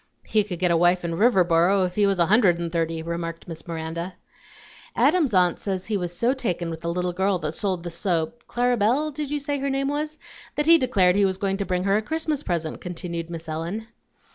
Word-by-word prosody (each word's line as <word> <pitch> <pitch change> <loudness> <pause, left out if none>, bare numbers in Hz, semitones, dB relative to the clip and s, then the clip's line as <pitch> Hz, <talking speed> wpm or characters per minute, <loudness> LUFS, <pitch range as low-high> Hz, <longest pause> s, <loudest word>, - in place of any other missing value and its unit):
"He 215 -1 +2
could 190 -4 -6
get 180 0 +1
a - - +4
wife 175 +1 +3
in 170 - -2
Riverboro 185 -2 +3
if 180 - -4
he 205 +1 +3
was 195 -1 +1
a 170 - +4
hundred 200 -3 +4
and 170 -1 -4
thirty," 165 -1 -1
remarked 170 0 -5
Miss 165 +1 -8
Miranda. 170 +2 -5 0.8
"Adam's 305 -2 +3
aunt 180 -2 +3
says 190 -2 -3
he 215 - -2
was 175 -3 -2
so 240 +2 +2
taken 180 -10 -2
with 160 0 -7
the 170 - -2
little 180 0 -1
girl 190 +1 +1
that 155 -2 -4
sold 185 -2 -2
the 175 - -5
soap 170 +5 -2
(Clara 245 0 +1
Belle, 255 +9 +2
did 295 0 -4
you 295 0 -1
say 285 0 -2
her 275 +1 -1
name 275 0 0
was?), 300 +1 -3 0.4
that 295 - 0
he 330 +1 +7
declared 195 -8 +3
he 200 - +3
was 190 -1 +1
going 195 0 -1
to 200 - -2
bring 180 -1 0
her 195 +1 +3
a - - 0
Christmas 315 +3 -2
present," 165 - -3
continued 170 -2 -5
Miss 165 -1 -7
Ellen. 170 +8 -4
185 Hz, 230 wpm, -24 LUFS, 170-240 Hz, 0.8 s, he